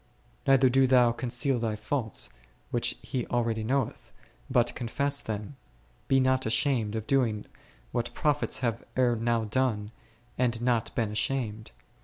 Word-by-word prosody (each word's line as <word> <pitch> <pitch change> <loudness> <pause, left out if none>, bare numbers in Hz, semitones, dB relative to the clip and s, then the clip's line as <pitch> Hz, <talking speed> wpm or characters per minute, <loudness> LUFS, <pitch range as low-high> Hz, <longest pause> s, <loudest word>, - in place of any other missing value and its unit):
Neither 135 -1 +6
do 130 +1 +4
thou 125 -2 +5
con 120 +1 -4
ceal 130 -1 +1
thy 110 -2 -1
faults, 110 0 -2 0.4
which - - 0
He 125 -3 -3
already 115 -2 0
knoweth, 135 +4 -2 0.4
but 120 -1 +2
con 120 - -4
fess 140 +4 +1
them. 110 +5 -5 0.5
Be 135 - +4
not 130 -1 +2
ashamed 115 -3 +1
of 110 -1 -3
doing 115 -5 +1 0.5
what 120 0 -2
prophets 150 -2 +1
have 115 -1 -1
ere 125 -2 +3
now 115 0 0
done, 110 -2 -1 0.5
and 120 -2 +1
not 120 -1 +1
been 110 -3 0
ashamed. 110 -1 -2
120 Hz, 150 wpm, -28 LUFS, 110-130 Hz, 0.5 s, Neither